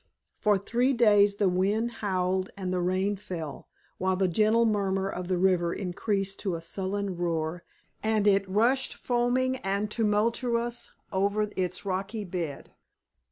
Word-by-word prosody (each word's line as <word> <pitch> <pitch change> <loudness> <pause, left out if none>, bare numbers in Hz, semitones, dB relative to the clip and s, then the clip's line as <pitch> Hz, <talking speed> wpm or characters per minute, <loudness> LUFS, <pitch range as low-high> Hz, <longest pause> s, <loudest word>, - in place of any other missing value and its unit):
For 210 -2 +3
three 240 +7 +1
days 205 -4 +5
the 200 -1 +2
wind 200 +6 +1
howled 185 -2 0
and 185 -2 -3
the 180 - 0
rain 190 +3 0
fell, 165 -6 -7 0.3
while 190 0 +1
the 190 0 +2
gentle 215 +6 +3
murmur 195 -3 +1
of 180 -2 -4
the 185 -1 0
river 175 -2 +2
increased 195 +1 -2
to 190 -4 -1
a - - -4
sullen 190 +2 -3
roar 165 -1 -2 0.4
and 215 -1 +1
it 195 -1 +3
rushed 235 +7 +2
foaming 250 +1 +1
and 200 0 -2
tumultuous 235 +2 0 0.2
over 200 +2 +1
its 185 +1 -2
rocky 195 +3 -2
bed. 170 -6 -5
195 Hz, 145 wpm, -28 LUFS, 185-215 Hz, 0.4 s, days